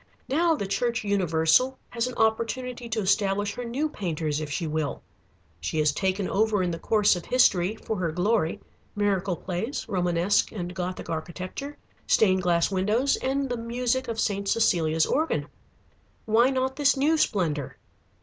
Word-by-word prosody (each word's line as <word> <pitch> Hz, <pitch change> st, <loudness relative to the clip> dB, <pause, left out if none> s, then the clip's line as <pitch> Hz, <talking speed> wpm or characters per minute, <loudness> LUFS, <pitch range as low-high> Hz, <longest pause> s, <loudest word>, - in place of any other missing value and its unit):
Now 325 Hz, +4 st, +2 dB
the 200 Hz, -, -3 dB
Church 235 Hz, +4 st, -1 dB
Universal 195 Hz, +5 st, +2 dB
has 235 Hz, 0 st, -1 dB
an 250 Hz, -, -6 dB
opportunity 235 Hz, +2 st, -1 dB
to 220 Hz, -1 st, -1 dB
establish 200 Hz, +1 st, +1 dB
her 245 Hz, -, -5 dB
new 255 Hz, +6 st, -1 dB
painters 160 Hz, -, -3 dB
if 150 Hz, -, -5 dB
she 165 Hz, +4 st, -2 dB
will. 155 Hz, -2 st, -3 dB, 0.6 s
She 80 Hz, -, -3 dB
has 150 Hz, -1 st, +3 dB
taken 190 Hz, +4 st, -1 dB
over 210 Hz, -2 st, +1 dB
in 175 Hz, -, 0 dB
the 165 Hz, -, -4 dB
course 210 Hz, -3 st, +3 dB
of 175 Hz, -, -6 dB
history, 205 Hz, -6 st, +3 dB
for 220 Hz, -1 st, -4 dB
her 170 Hz, -3 st, -1 dB
glory, 180 Hz, 0 st, 0 dB, 0.4 s
miracle 195 Hz, -3 st, 0 dB
plays, 195 Hz, -, -4 dB
Romanesque 180 Hz, +1 st, +1 dB
and 180 Hz, -4 st, -5 dB
Gothic 180 Hz, 0 st, -4 dB
architecture, 185 Hz, -, -5 dB, 0.3 s
stained 190 Hz, -3 st, +4 dB
glass 175 Hz, 0 st, +2 dB
windows, 210 Hz, +8 st, +2 dB
and 270 Hz, +1 st, -1 dB
the 245 Hz, -1 st, -3 dB
music 245 Hz, +2 st, -1 dB
of 230 Hz, -1 st, -3 dB
St. 200 Hz, -2 st, -1 dB
Cecilia's 165 Hz, -8 st, +2 dB
organ. 315 Hz, +3 st, 0 dB, 0.8 s
Why 230 Hz, +3 st, +4 dB
not 265 Hz, 0 st, -1 dB
this 285 Hz, -1 st, +3 dB
new 300 Hz, +4 st, +3 dB
splendor? 170 Hz, -, 0 dB
205 Hz, 160 wpm, -26 LUFS, 175-245 Hz, 0.8 s, stained